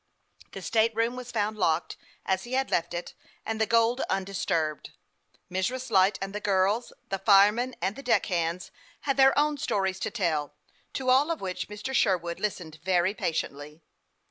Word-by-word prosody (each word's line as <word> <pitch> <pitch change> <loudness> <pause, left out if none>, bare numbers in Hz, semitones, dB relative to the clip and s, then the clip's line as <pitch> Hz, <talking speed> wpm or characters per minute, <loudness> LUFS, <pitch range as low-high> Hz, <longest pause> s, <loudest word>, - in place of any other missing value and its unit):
The - - -7
state 225 0 +2
room 230 +2 +1
was 250 -1 -7
found 215 -1 -1
locked, 170 -4 0 0.3
as 190 -1 0
he 240 - -8
had 265 +1 0
left 170 0 0
it, 170 - -5 0.3
and 220 0 -2
the 220 - +2
gold 230 +2 +3
undis 195 0 -2
turbed. 155 -2 -1 0.6
Mrs. 245 +7 -2
Light 195 0 +4
and 195 0 -6
the 210 - -3
girls, 205 +3 +1 0.2
the 195 - -2
firemen 210 +5 +4
and 190 +3 0
the - - -8
deck 250 - +2
hands, 170 -2 -2 0.3
had 275 -2 0
their 270 0 +5
own 295 0 +2
stories 190 -4 -1
to - - -2
tell, 155 -9 -1 0.4
to 255 -1 0
all 275 +5 +4
of 330 - -1
which 185 -2 -4
Mr. 210 +5 -6
Sherwood 175 -8 +1
listened 170 -7 -4
very 185 +1 +2
patiently. 150 -4 -4
200 Hz, 175 wpm, -27 LUFS, 180-235 Hz, 0.6 s, their